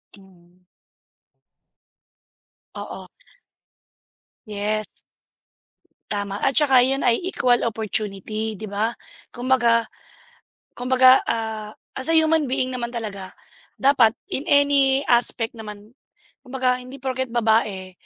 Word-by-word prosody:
Mhm. 180 -2 -22 2.1
Oo. - - -7 1.4
Yes. 210 +1 -2 1.3
Tama 200 -1 -3
at 270 - 0
tsaka 270 -4 +6
yun 270 +1 -1
ay 235 -1 +3
equal 250 -10 +1
opportunity 215 0 -3
di 215 - -11
ba? 215 +3 -2 0.3
Kumbaga, 240 -2 +1 0.9
kumbaga, 255 +1 +5
ah, 220 -2 -3 0.2
as 260 - -3
a 325 - +3
human 315 -3 +3
being 255 0 -1
naman 240 -2 -3
talaga 210 -5 -6 0.5
dapat 250 -5 +3 0.2
in 275 - -2
any 280 -1 +3
aspect 235 -1 +2
naman. 210 -1 -11 0.5
Kumbaga 255 -1 -1
hindi 255 +2 -10
porke't 260 -1 -3
babae 220 -5 0
235 Hz, 100 wpm, -22 LUFS, 215-260 Hz, 2.1 s, tsaka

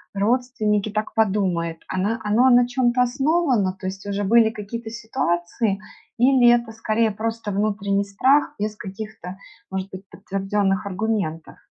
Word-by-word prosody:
родственники 215 -1 0
так 215 +1 -3
подумают, 185 -6 0
оно 200 +5 -1
оно 225 +5 +4
на 245 -1 +5
чём-то 245 0 +2
основано, 265 - +1
то - - -8
есть 190 +1 -6
уже 200 0 -2
были 225 +2 +5
какие-то 220 +1 -7
ситуации, 220 -3 -1 0.4
или 250 0 +5
это 240 -1 +2
скорее 225 0 0
просто 225 +1 -4
внутренний 200 0 0
страх 260 +9 +2
без 210 +1 -2
каких-то, 195 -2 -8 0.3
может 190 0 -3
быть, 190 +1 -10
подтвержденных 195 +1 -1
аргументов? 195 -5 -3
215 Hz, 135 wpm, -22 LUFS, 195-235 Hz, 0.4 s, на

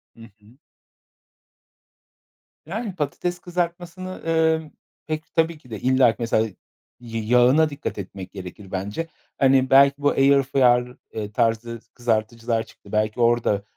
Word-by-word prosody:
Hı 115 - -16 0.2
hı. 110 +5 -21 2.1
Yani, 200 +2 -5
patates 175 +3 -3
kızartmasını, 175 +1 -4
ımm, 160 -1 +1 0.4
pek, 155 +1 -5
tabii 165 -1 +2
ki 125 - -20
de, 110 -3 -6
illaki, 130 -2 +3
mesela, 115 -1 +1 0.5
y 115 -2 -5
yağına 125 +7 +4
dikkat 145 0 -5
etmek 95 -1 -7
gerekir 95 +1 -10
bence. 100 - -3 0.3
Hani, 130 -1 +4
belki 140 +1 +6
bu 145 0 +2
air 140 0 +4
fryer 125 -2 +2 0.4
tarzı 115 0 0
s - - -37
kızartıcılar 115 0 -1
çıktı. 100 -2 -18
Belki 110 +2 0
orada 115 -4 +2
125 Hz, 125 wpm, -23 LUFS, 115-155 Hz, 2.1 s, belki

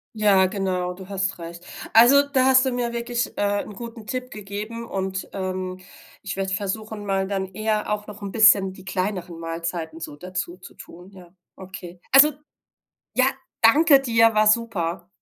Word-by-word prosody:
Ja, 200 -3 +4
genau, 185 -2 -2
du 185 0 -12
hast 195 -1 -2
recht. 170 +1 -9 0.3
Also 270 +5 +7
da 270 -2 +2
hast 260 0 +5
du 260 - 0
mir 240 -1 -2
wirklich, 235 0 -2
äh, 205 0 0
'n - - -10
guten 230 +1 -9
Tipp 255 +2 -4
gegeben 210 +2 -7
und, 190 -1 -4
ähm, 185 -1 -4 0.4
ich 200 - -5
werde 190 0 -2
versuchen, 210 +2 -4
mal 195 -1 0
dann 195 -1 -2
eher 215 +1 -1
auch 210 0 -3
noch 210 0 -10
'n 200 -1 -6
bisschen 205 -4 +5
die 190 - -14
kleineren 185 -3 -3
Mahlzeiten 165 0 -5
so 145 - -7
dazuzutun, 180 +1 -8
ja. 180 -2 -16 0.2
Okay. 180 -2 -10
Also, 295 +3 +8 0.8
ja, 255 - +5 0.4
danke 280 +5 +6
dir, 230 -3 +3
war 215 0 +3
super. 190 -6 0
200 Hz, 160 wpm, -23 LUFS, 185-225 Hz, 0.8 s, Also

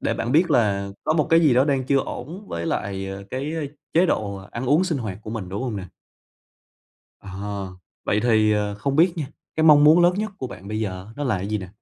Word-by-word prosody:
để - - 0
bạn 120 - -2
biết 170 +4 +4
là 100 -4 +2 0.2
có - - +2
một 155 -3 +1
cái 165 - +6
gì 150 -7 +4
đó 130 +2 +5
đang 135 -3 0
chưa 140 +2 +2
ổn 160 +9 -6
với - - -4
lại, 100 -11 -3
ờ, 95 0 -6
cái, 140 +5 -3
ơ, 165 - -2 0.3
chế 175 +3 +4
độ 100 -8 -1
ăn 120 +2 -5
uống 150 +8 +4
sinh 165 -6 -1
hoạt 105 -5 -5
của 110 - -7
mình, 110 -5 -5
đúng 100 +6 -4
hông 120 -5 -3
nè? 95 -2 -6 1.3
Ờ. 100 -1 -6 0.3
Vậy 105 - +1
thì, 110 -3 +3
ờ, 105 -1 -1
không 135 +7 -2
biết 170 +2 +5
nha, 155 -4 -3 0.3
cái 160 - +2
mong 150 -2 +7
muốn 160 +4 +7
lớn 175 +1 +4
nhất 215 +2 -2
của 130 - -3
bạn 100 -4 -10
bây 110 +1 -3
giờ 95 -2 -4
nó 145 - -3
là 110 -8 0
gì 105 +2 -2
nè? 95 -2 -8
120 Hz, 245 wpm, -23 LUFS, 100-150 Hz, 1.3 s, mong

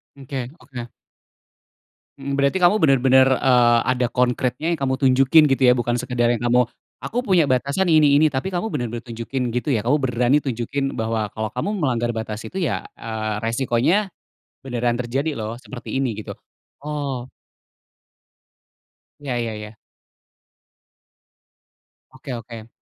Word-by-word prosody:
Mmm, 140 - -13
oke 130 -2 -5
oke. 120 -3 -9 1.3
Mhm, 140 0 -4
berarti 140 +7 +1
kamu 180 +4 +5
bener-bener, 130 -4 +5
eee, 125 -3 +4
ada 125 -1 +1
konkretnya 125 +4 0
yang 170 - 0
kamu 130 -1 -1
tunjukin 135 +3 +5
gitu 135 - +1
ya. 125 - +7
Bukan 120 -1 -1
sekedar 125 -1 0
yang 120 - +2
kamu, 125 +1 +4 0.4
“Aku 245 +2 -3
punya 175 -8 +3
batasan 140 +9 +1
ini 155 -3 +5
ini,” 155 +2 +5
tapi 145 +8 -3
kamu 180 +6 -1
bener-bener 120 - -3
tunjukin 120 +2 -4
gitu 125 +5 -1
ya. 110 - +1
Kamu 125 +7 +2
berani 125 0 +2
tunjukin 135 0 -2
bahwa, 110 -1 -1
"Kalau 110 -1 -3
kamu 125 - -3
melanggar 120 -4 0
batas 110 -1 -5
itu 190 - -5
ya, 160 - -1
eee, 110 -1 -4
resikonya 135 - +1 0.5
beneran 120 -2 -1
terjadi 135 +5 -2
loh 110 0 -5
seperti 130 0 -6
ini," 130 -4 -1
gitu. - - -9 0.4
Oh. 140 -4 -4 1.9
Iya 140 -3 -4
iya 115 - -3
iya. 105 +1 -9 2.4
Oke 130 - -8
oke. 115 -1 -9
130 Hz, 140 wpm, -22 LUFS, 120-140 Hz, 2.4 s, ya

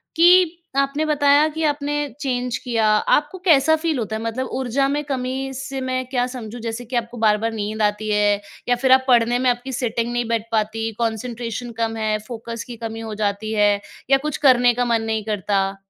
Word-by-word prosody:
कि 345 0 +5 0.2
आपने 275 +3 +1
बताया 290 0 +4
कि 320 +1 -4
आपने 290 -1 0 0.3
चेंज 250 -3 -2
किया, 230 -3 -1
आपको 295 - +2
कैसा 315 -1 +5
फ़ील 315 -2 -1
होता 220 -1 -3
है? 220 - -4
मतलब 230 +3 -3
ऊर्जा 265 +2 +1
में 295 +1 -1
कमी 265 -1 -3
से 270 0 -5
मैं 255 0 -2
क्या 250 -2 +1
समझूँ? 245 -2 -7
जैसे 230 +1 -5
कि 250 +2 -6
आपको 235 0 -2
बार-बार 220 +1 +2
नींद 215 0 -3
आती 210 +1 0
है? 205 -1 +2 0.3
या 245 - +4
फिर 260 +1 +1
आप 260 0 +6
पढ़ने 240 0 +4
में 255 0 +2
आपकी 245 +2 -2
सिटिंग 235 -1 -1
नहीं 240 0 0
बैठ 230 -1 -1
पाती? 225 +1 -1
कॉन्सन्ट्रेशन 235 +1 -3
कम 225 0 0
है? 215 -1 0
फोकस 230 -1 -6
की 240 - -8
कमी 225 0 -6
हो 225 -1 -6
जाती 205 +2 -1
है? 205 -1 +3 0.3
या 275 - +6
कुछ 300 - -2
करने 245 -1 +5
का 245 +1 0
मन 230 -1 +1
नहीं 220 -1 -1
करता? 195 -2 -1
240 Hz, 200 wpm, -21 LUFS, 220-270 Hz, 0.3 s, आप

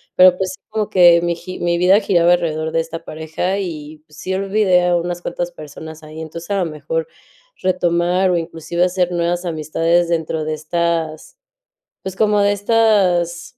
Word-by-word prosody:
pero, 185 0 +7
pues, 190 -1 -2
sí - - -14
como 215 -1 -2
que 175 -3 +6
mi 170 0 -1
gi 185 +2 -9
mi 170 0 0
vida 185 +4 +5
giraba 175 -4 +3
alrededor 160 -2 -1
de 165 - +1
esta 165 0 -8
pareja 160 +5 -3
y, 155 -5 -6
pues, 150 - -18
sí, 190 - -4
olvidé 195 -2 +2
a 175 - +2
unas 175 +1 -3
cuantas 175 0 -3
personas 160 0 -10
ahí. 155 +1 -9
Entonces, 165 +3 -8
a 200 - +1
lo - - -1
mejor, 155 +2 -3 0.5
retomar 180 0 +1
o 175 - +2
inclusive 165 +1 -2
hacer 180 -1 0
nuevas 175 +1 -1
amistades 165 +1 0
dentro 160 -1 -1
de 155 - -2
estas, 160 - -2 0.7
pues, 190 -1 -5
como 210 0 +2
de 200 0 +3
estas 205 -3 +1
175 Hz, 175 wpm, -18 LUFS, 160-185 Hz, 0.7 s, pero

